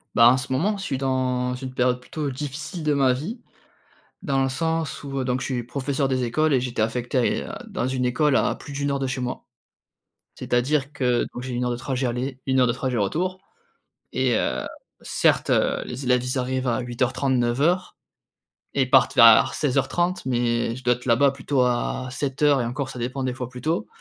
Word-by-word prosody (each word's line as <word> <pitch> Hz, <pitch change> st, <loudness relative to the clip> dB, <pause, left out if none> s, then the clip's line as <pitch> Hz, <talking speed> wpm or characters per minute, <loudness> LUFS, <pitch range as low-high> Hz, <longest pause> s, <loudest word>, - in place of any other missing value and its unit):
Bah, 115 Hz, +2 st, +8 dB
en 130 Hz, -, +4 dB
ce 130 Hz, 0 st, -5 dB
moment, 200 Hz, +10 st, +1 dB
je 195 Hz, -, -6 dB
suis 135 Hz, -7 st, -2 dB
dans 130 Hz, -1 st, 0 dB
une 130 Hz, 0 st, -7 dB
période 125 Hz, 0 st, +1 dB
plutôt 145 Hz, +3 st, -4 dB
difficile 150 Hz, +6 st, -5 dB
de 150 Hz, -1 st, +2 dB
ma 135 Hz, -3 st, +3 dB
vie, 185 Hz, -, -5 dB, 0.8 s
dans 135 Hz, -1 st, +1 dB
le 135 Hz, -, +1 dB
sens 160 Hz, +2 st, -2 dB
où, 135 Hz, -1 st, -4 dB
heu, -, -, -1 dB
donc 125 Hz, 0 st, -1 dB
je -, -, -3 dB
suis 125 Hz, -3 st, -2 dB
professeur 135 Hz, +3 st, -2 dB
des 130 Hz, -1 st, 0 dB
écoles 155 Hz, +5 st, +1 dB
et 130 Hz, -, +3 dB
j'étais 120 Hz, -3 st, -2 dB
affecté 120 Hz, +3 st, -1 dB
à 125 Hz, -, +3 dB
et -, -, 0 dB
heu, -, -, -8 dB, 0.2 s
dans -, -, -2 dB
une 130 Hz, -1 st, -1 dB
école 140 Hz, +3 st, +2 dB
à -, -, +2 dB
plus 145 Hz, -, -10 dB
de 140 Hz, -, -5 dB
1 145 Hz, 0 st, 0 dB
heure 140 Hz, -, 0 dB
de 135 Hz, -, -1 dB
chez 130 Hz, 0 st, -3 dB
moi. 125 Hz, +1 st, -4 dB, 0.9 s
C'est-à-dire 135 Hz, +3 st, 0 dB
que 125 Hz, -4 st, +1 dB
donc 125 Hz, -, -6 dB
j'ai 130 Hz, -1 st, -5 dB
1 120 Hz, +1 st, -1 dB
heure 125 Hz, -, 0 dB
de 120 Hz, -, -2 dB
trajet 130 Hz, 0 st, -2 dB
aller, 125 Hz, +2 st, -3 dB
1 130 Hz, -1 st, +2 dB
heure 125 Hz, -, +5 dB
de 120 Hz, -, +1 dB
trajet 125 Hz, -1 st, -2 dB
retour 175 Hz, -, -1 dB, 0.7 s
et 130 Hz, -3 st, +1 dB
heu, 60 Hz, -, -1 dB, 0.4 s
certes, -, -, +1 dB
heu, -, -, +2 dB
les 125 Hz, +3 st, -6 dB
élèves, 125 Hz, -1 st, +3 dB
ils 125 Hz, +2 st, -1 dB
arrivent 130 Hz, 0 st, -1 dB
à 120 Hz, +1 st, +1 dB
08:30-09:00 130 Hz, +6 st, 0 dB, 0.8 s
et 135 Hz, -, +3 dB
partent 130 Hz, 0 st, +4 dB
vers 115 Hz, -3 st, +7 dB
16:30 175 Hz, +5 st, 0 dB
mais 120 Hz, -2 st, 0 dB
je 130 Hz, -, -11 dB
dois 120 Hz, -, +4 dB
être 120 Hz, +1 st, -12 dB
là-bas 130 Hz, +4 st, +4 dB
plutôt 135 Hz, 0 st, 0 dB
à 125 Hz, +1 st, -1 dB
07:00 140 Hz, +1 st, +1 dB
et 120 Hz, -, -1 dB
encore 130 Hz, +3 st, -3 dB
ça 130 Hz, -, -8 dB
dépend 125 Hz, +3 st, -3 dB
des 130 Hz, -, -1 dB
fois 125 Hz, -1 st, -5 dB
plus 125 Hz, -1 st, -10 dB
tôt 160 Hz, +4 st, -1 dB
130 Hz, 215 wpm, -24 LUFS, 125-140 Hz, 0.9 s, Bah